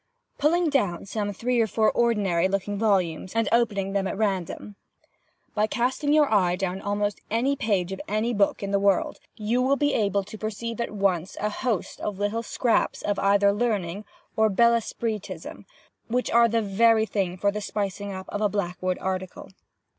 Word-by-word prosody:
(pulling 340 Hz, +3 st, +3 dB
down 205 Hz, -, 0 dB
some 205 Hz, +1 st, -3 dB
three 240 Hz, +5 st, -1 dB
or 225 Hz, -, +2 dB
four 220 Hz, +1 st, +2 dB
ordinary 200 Hz, -7 st, +2 dB
looking 195 Hz, +1 st, -2 dB
volumes, 190 Hz, -4 st, 0 dB
and 225 Hz, -2 st, +2 dB
opening 205 Hz, -5 st, +1 dB
them 195 Hz, -1 st, 0 dB
at 195 Hz, -, -4 dB
random). 200 Hz, -1 st, -2 dB, 0.8 s
"By 215 Hz, +1 st, +1 dB
casting 255 Hz, +6 st, 0 dB
your 300 Hz, -1 st, +5 dB
eye 180 Hz, -4 st, +3 dB
down 190 Hz, 0 st, -3 dB
almost 205 Hz, 0 st, -2 dB
any 245 Hz, +6 st, +1 dB
page 195 Hz, -7 st, 0 dB
of 190 Hz, -, -5 dB
any 215 Hz, +3 st, 0 dB
book 200 Hz, -1 st, +1 dB
in 200 Hz, -, -3 dB
the 200 Hz, -, +2 dB
world, 200 Hz, -2 st, +1 dB, 0.2 s
you 230 Hz, +3 st, 0 dB
will 265 Hz, +2 st, +3 dB
be 290 Hz, 0 st, +1 dB
able 200 Hz, -2 st, +1 dB
to 215 Hz, +2 st, -10 dB
perceive 225 Hz, +2 st, -4 dB
at -, -, -2 dB
once 195 Hz, -4 st, -1 dB
a 210 Hz, 0 st, -1 dB
host 225 Hz, -4 st, -3 dB
of 205 Hz, -2 st, -3 dB
little 205 Hz, +3 st, -1 dB
scraps 235 Hz, 0 st, 0 dB
of 205 Hz, -1 st, -1 dB
either 200 Hz, 0 st, +4 dB
learning 205 Hz, -4 st, -1 dB, 0.3 s
or 220 Hz, 0 st, +3 dB
bel 235 Hz, +4 st, +4 dB
esprit 225 Hz, -2 st, -2 dB
ism, 185 Hz, +2 st, -9 dB, 0.4 s
which 250 Hz, +2 st, -1 dB
are 235 Hz, 0 st, +6 dB
the 230 Hz, 0 st, 0 dB
very 220 Hz, +2 st, +3 dB
thing 190 Hz, -4 st, -2 dB
for 200 Hz, +2 st, +1 dB
the 210 Hz, +1 st, -4 dB
spicing 200 Hz, -1 st, -3 dB
of 190 Hz, -1 st, -6 dB
a 205 Hz, 0 st, 0 dB
Blackwood 185 Hz, -2 st, -2 dB
article. 185 Hz, -1 st, -4 dB
205 Hz, 180 wpm, -25 LUFS, 195-230 Hz, 0.8 s, are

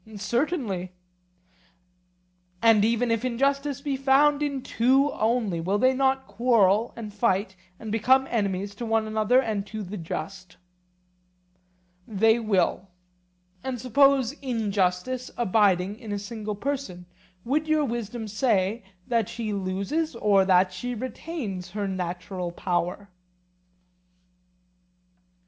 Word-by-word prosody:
Certainly. 205 Hz, -, -2 dB, 1.7 s
And 225 Hz, -1 st, +5 dB
even 230 Hz, +2 st, +1 dB
if 230 Hz, 0 st, 0 dB
injustice 275 Hz, +3 st, 0 dB
be 285 Hz, -2 st, -2 dB
found 280 Hz, +2 st, +3 dB
in 280 Hz, -3 st, -2 dB
two 270 Hz, +5 st, +2 dB
only, 220 Hz, -6 st, 0 dB
will 190 Hz, +5 st, 0 dB
they 255 Hz, +4 st, +3 dB
not 265 Hz, 0 st, +1 dB
quarrel 215 Hz, 0 st, +2 dB
and 215 Hz, -3 st, -7 dB
fight, 200 Hz, -3 st, 0 dB, 0.2 s
and 220 Hz, -2 st, -6 dB
become 260 Hz, +5 st, +3 dB
enemies 200 Hz, -3 st, -1 dB
to 235 Hz, +4 st, -6 dB
one 225 Hz, 0 st, +1 dB
another 215 Hz, +3 st, +2 dB
and 220 Hz, -6 st, -1 dB
to 215 Hz, -1 st, -6 dB
the 200 Hz, +2 st, -6 dB
just? 185 Hz, +2 st, -6 dB, 1.5 s
They 220 Hz, +2 st, +3 dB
will. 195 Hz, -3 st, 0 dB, 0.8 s
And 260 Hz, -2 st, -3 dB
suppose 265 Hz, +1 st, +3 dB
injustice 220 Hz, -1 st, -1 dB
abiding 205 Hz, -2 st, +2 dB
in 225 Hz, -4 st, -8 dB
a 205 Hz, -, -1 dB
single 210 Hz, 0 st, -5 dB
person, 210 Hz, -7 st, -4 dB, 0.4 s
would 300 Hz, +6 st, 0 dB
your 310 Hz, -1 st, +2 dB
wisdom 235 Hz, -2 st, -4 dB
say 210 Hz, -1 st, 0 dB, 0.2 s
that 230 Hz, -4 st, 0 dB
she 220 Hz, -3 st, -4 dB
loses 200 Hz, -, -2 dB
or 200 Hz, -4 st, +3 dB
that 185 Hz, 0 st, +3 dB
she 245 Hz, +7 st, -4 dB
retains 230 Hz, -, -5 dB
her 205 Hz, -1 st, -1 dB
natural 180 Hz, -1 st, -4 dB
power? 180 Hz, +2 st, -2 dB
220 Hz, 120 wpm, -26 LUFS, 195-255 Hz, 1.7 s, And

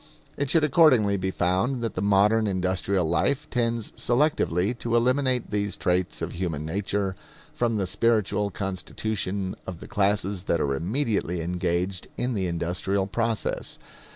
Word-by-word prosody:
It 140 Hz, -1 st, -2 dB
should 160 Hz, +2 st, +4 dB
accordingly 130 Hz, -9 st, +5 dB
be 95 Hz, -1 st, -1 dB
found 95 Hz, +8 st, 0 dB
that 115 Hz, -, -2 dB
the -, -, -3 dB
modern 105 Hz, +2 st, +4 dB
industrial 95 Hz, -1 st, 0 dB
life 130 Hz, -, +1 dB
tends 115 Hz, -2 st, 0 dB
selectively 120 Hz, -, +1 dB
to 115 Hz, 0 st, -1 dB
eliminate 125 Hz, +1 st, +2 dB
these 105 Hz, -1 st, -1 dB
traits 90 Hz, 0 st, 0 dB
of -, -, -3 dB
human 85 Hz, -4 st, -3 dB
nature 95 Hz, +2 st, -1 dB, 0.4 s
from 115 Hz, -2 st, 0 dB
the 100 Hz, -, 0 dB
spiritual 105 Hz, 0 st, +1 dB
constitution 95 Hz, 0 st, -3 dB
of 90 Hz, -3 st, -6 dB
the -, -, -10 dB
classes 100 Hz, -2 st, 0 dB
that 85 Hz, -, +1 dB
are 70 Hz, -, +1 dB
immediately 95 Hz, -, -1 dB
engaged 90 Hz, +2 st, -1 dB
in 125 Hz, +1 st, -1 dB
the 95 Hz, -4 st, -1 dB
industrial 90 Hz, +3 st, -1 dB
process. 115 Hz, +2 st, -2 dB
100 Hz, 145 wpm, -26 LUFS, 90-115 Hz, 0.4 s, accordingly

